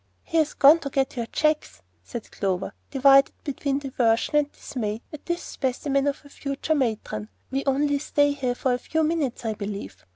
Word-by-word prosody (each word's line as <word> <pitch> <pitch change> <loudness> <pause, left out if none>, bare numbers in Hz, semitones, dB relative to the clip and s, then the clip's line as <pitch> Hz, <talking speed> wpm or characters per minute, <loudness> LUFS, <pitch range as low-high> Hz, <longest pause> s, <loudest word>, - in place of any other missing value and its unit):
"He 330 - -2
has 310 -2 +2
gone 295 +4 +7
to 280 - -5
get 270 0 0
your 235 -2 -3
checks," 300 - 0 0.2
said 225 - -8
Clover, 190 -2 -2 0.2
divided 275 0 +5
between 280 -1 -1
diversion 255 -2 +1
and 295 -1 +2
dismay 220 -3 -4
at 300 - -10
this 345 0 -1
specimen 275 +1 -1
of 285 - 0
her 285 - -16
future 280 +2 -2
"matron." 220 - -2 0.2
"We 270 +1 -1
only 285 +1 +2
stay 290 0 +2
here 260 -4 -1
a 250 -1 +3
few 320 +5 0
minutes, 300 -7 -1
I 220 - 0
believe. 200 - -6
275 Hz, 175 wpm, -25 LUFS, 230-290 Hz, 0.2 s, gone